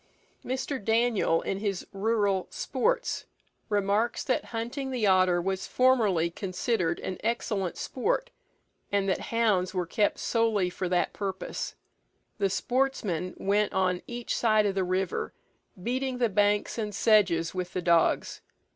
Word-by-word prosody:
Mr. 260 -2 -3
Daniell, 225 -6 +2
in 195 - -2
his 200 -3 -2
"Rural 200 -2 +1
Sports," 485 +2 -1 0.4
remarks 205 +3 +1
that 255 - 0
hunting 240 +4 -4
the 250 -4 0
otter 185 -2 +4
was 190 +2 -2
formerly 215 -10 +3
considered 185 -1 -1
as 185 - -4
excellent 210 -5 -1
sport, - - -1 0.6
and 200 -1 +1
that 190 - +1
hounds 205 -5 +1
were 180 -1 0
kept 205 +4 +1
solely 220 -6 +1
for 185 0 -3
that 180 -1 +1
purpose. 195 -2 -4 0.6
The 200 -1 +2
sportsmen 205 -6 -1
went 205 +2 +1
on 185 -1 +1
each 240 -1 -3
side 215 -2 +3
of 200 - +1
the 190 -1 0
river, 185 0 -2 0.5
beating 255 +2 -1
the 240 -2 +2
banks 205 +2 +1
and 210 -2 -3
sedges 190 -8 +3
with 180 -1 -4
the 185 - -1
dogs. 170 -1 +2
205 Hz, 140 wpm, -28 LUFS, 185-230 Hz, 0.6 s, otter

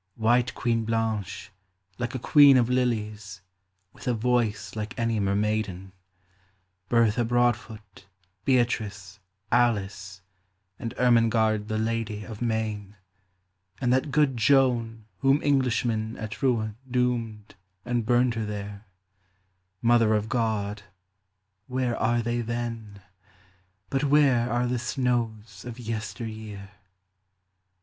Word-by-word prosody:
White 120 +2 +2
Queen 115 -1 0
Blanche, 110 -3 -2 0.5
like 120 +1 -3
a - - 0
queen 140 +2 +6
of 120 0 +2
lilies, 105 -6 -2 0.5
With - - -12
a 125 - +2
voice 115 -2 0
like 110 +3 -5
any 115 -2 0
mer 100 0 0
maiden, 100 -3 -2 0.5
— 95 0 -41
Bertha 115 0 +3
Broadfoot, 115 -4 -1 0.4
Beatrice, 105 -6 0 0.3
Alice, 100 -5 0 0.6
And 115 - -5
Ermengarde 115 -3 +3
the 110 -1 -2
lady 110 -1 -2
of 110 0 -9
Maine, 110 -3 -2 0.4
— 95 0 -48
And 125 -1 +2
that 130 +3 +1
good 140 -1 +2
Joan 115 -3 +2
whom 135 +1 +3
Englishmen 120 -5 0
At 110 +3 -7
Rouen 110 -5 0
doomed 120 -4 -1 0.3
and 120 -1 0
burned 120 +1 +2
her 115 -1 -3
there, 100 0 -7 0.5
— 95 0 -46
Mother 115 -2 +4
of 105 +1 -1
God, 110 -4 -1 0.9
where 125 -2 -1
are 120 +1 +1
they 120 +1 -1
then? 115 -4 -5 0.9
But 135 +2 0
where 135 -5 +3
are 120 +1 +1
the 125 0 -1
snows 115 -5 -2
of 120 -1 -8
yester 115 0 -5
year 105 -3 -8
115 Hz, 120 wpm, -26 LUFS, 105-120 Hz, 0.9 s, queen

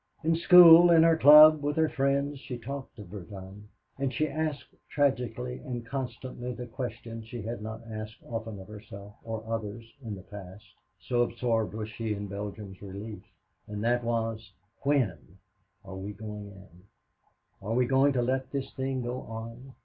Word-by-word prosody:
In 165 +1 +2
school, 175 0 +9
in 165 -1 +7
her 165 0 +5
club, 155 +1 +9
with 145 0 -1
her 160 0 +3
friends, 140 0 0
she 130 -3 -6
talked 135 +3 -7
Verdun, 100 0 -10 0.3
and 135 -1 0
she 155 +2 0
asked 155 0 -3 0.2
tragically 125 -3 -1
and 120 -5 -6
constantly 125 -1 -5
the 125 - -6
question 120 -2 -6
that 110 - -11
she 115 -1 -7
had 115 +1 -5
not 110 +1 -7
asked 110 0 -6
often 110 -3 -6
of 95 - -11
herself 105 -1 -11
or 110 -1 -5
others 115 0 -4 0.2
in 110 -3 -5
the 95 - -11
past, 100 +1 -11 0.3
so 120 -1 0
absorbed 115 -2 0
was 110 -1 -4
she 110 0 -3
in 100 0 -5
Belgium's 100 -1 -7
relief, 100 +2 -8 0.5
and 105 0 -5
that 120 +1 +1
was, 115 -3 -2 0.3
"When 105 - 0 0.5
are 95 -1 -8
we 100 +2 -6
going 105 0 -8
in? 95 -3 -15 0.8
Are 105 +4 -2
we 125 0 +3
going 135 +3 +3
to 125 -2 +1
let 130 +1 -1
this 135 -1 -4
thing 130 -1 -2
go 125 +1 -3
on? 115 +3 -9
115 Hz, 170 wpm, -29 LUFS, 105-135 Hz, 0.8 s, school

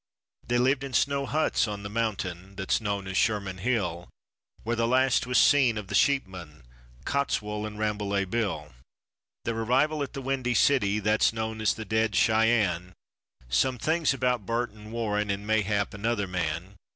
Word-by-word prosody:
They 120 - +1
lived 130 +2 +2
in 135 -1 -6
snow 140 0 +1
huts 155 -6 +1
on 105 -1 -5
the - - -4
mountain 100 -4 -3
that's 95 +3 0
known 100 -2 -2
as 95 0 -5
Sherman 100 -4 0
Hill, 90 -7 -1 0.5
Where 115 +2 -1
the 115 0 +1
last 130 +1 +2
was 125 - +1
seen 130 -6 +5
of 100 -3 -6
the - - -5
sheepmen, 90 - 0 0.4
Cottswool 105 -6 -1
and 105 -1 -9
Rambolet 105 -2 -1
Bill; 95 - -2 0.7
Their 115 -1 -2
arrival 135 +7 +1
at 140 - -4
the 135 - -5
Windy 130 -2 -1
City 105 -6 +3
that's 105 +1 +2
known 110 0 -4
as 105 -4 +2
the 110 - -7
dead 110 0 0
Shyann, 110 -6 +2 0.5
Some 95 - +1
things 160 +6 +1
about 125 -4 0
Burt 120 0 -1
and 105 +1 -13
Warren 105 -3 -1
and 100 +1 -2
mayhap 105 -1 0
another 105 0 -1
man. 90 +2 -3
110 Hz, 165 wpm, -27 LUFS, 100-125 Hz, 0.7 s, seen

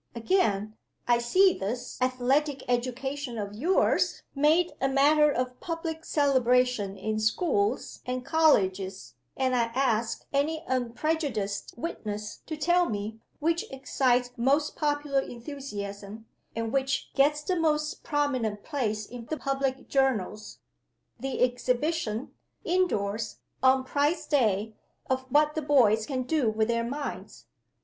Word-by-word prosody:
Again: 220 - +1 0.3
I 240 -1 +4
see 370 +11 +4
this 235 +6 -5
Athletic 260 +3 +1
Education 255 +1 -2
of 205 -1 -4
yours 325 - +1
made 310 +5 +3
a 270 - +3
matter 295 +3 +5
of 250 -1 -2
public 330 -1 -4
celebration 250 -7 +2
in 215 +3 -2
schools 360 - 0
and 250 0 -4
colleges; 195 - +2 0.2
and 260 -1 +1
I 235 -1 +3
ask 235 -4 0
any 310 +3 0
unprejudiced 250 -4 -2
witness 210 -7 -5
to 315 - -4
tell 350 +2 +3
me 215 +1 -4 0.2
which 330 +2 0
excites 255 -2 +1
most 275 +5 +1
popular 290 -2 0
enthusiasm, 220 -6 -7 0.3
and 230 0 -3
which 270 0 -1
gets 295 +2 +3
the 370 - 0
most 305 -2 0
prominent 255 -9 -1
place 220 -8 -2
in 240 0 -9
the 315 - -3
public 270 -1 -2
journals 220 -6 0 0.6
the 265 +1 -1
exhibition, 250 0 -1 0.3
indoors 225 - 0 0.2
(on 260 0 +4
Prize 290 +5 0
day), 220 -6 +1 0.4
of 260 0 0
what 300 +2 +4
the 315 - -2
boys 235 -7 +4
can 260 -3 -2
do 265 -3 +1
with 220 +1 0
their 230 0 +1
minds? 280 +5 -6
260 Hz, 125 wpm, -28 LUFS, 225-295 Hz, 0.6 s, matter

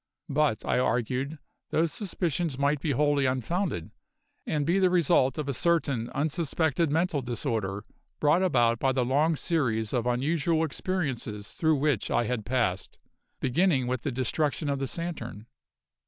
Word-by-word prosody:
But, 145 -5 +1
I - - +1
argued, 130 +4 -1 0.3
those 160 0 +1
suspicions 175 - -2
might 140 +1 +1
be 160 - -2
wholly 145 0 +2
unfounded, 130 - -2 0.6
and 150 -2 0
be 175 +5 +2
the 185 -1 +4
result 160 -6 +3
of 150 -2 -3
a 140 - -1
certain 140 -7 +1
unsuspected 160 +1 0
mental 160 -1 +1
disorder 110 -5 -2 0.3
brought 150 +4 +3
about 120 -10 +3
by 135 -1 +2
the 130 -2 +1
long 150 +6 +2
series 120 - 0
of 120 -2 0
unusual 155 +6 +1
experiences 135 - -3
through 160 -1 +2
which 145 -5 0
I - - +2
had 115 -2 -3
passed, 120 -7 -1 0.4
beginning 135 0 +2
with 125 -1 -2
the 140 - -2
destruction 145 +4 -1
of 140 - -1
the 135 - -2
Saturn. 125 - -5
140 Hz, 150 wpm, -28 LUFS, 125-160 Hz, 0.6 s, the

